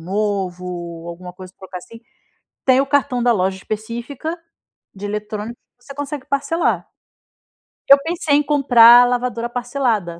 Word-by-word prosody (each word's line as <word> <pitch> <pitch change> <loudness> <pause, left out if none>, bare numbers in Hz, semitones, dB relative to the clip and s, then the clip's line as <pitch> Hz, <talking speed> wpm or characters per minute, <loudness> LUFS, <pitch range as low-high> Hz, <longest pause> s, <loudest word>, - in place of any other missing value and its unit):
novo, 180 -3 -4
alguma 180 +1 -9
coisa 185 0 -12
pra - - -46
trocar 180 - -6
assim, 230 +5 -14 0.6
tem 260 0 +4
o 275 - 0
cartão 275 -3 0
da 240 - +4
loja 190 -2 0
específica 235 - -5 0.6
de 200 +1 -10
eletrônico 210 +2 -5 0.2
que 245 - -27
você 275 - -10
consegue 290 -1 -6
parcelar. 280 +4 -1 1.0
Eu 275 - +10
pensei 325 -3 0
em 295 - +2
comprar 245 -5 +7
a - - +4
lavadora 245 -1 -2
parcelada. 240 -8 -2
235 Hz, 145 wpm, -19 LUFS, 190-275 Hz, 1.0 s, Eu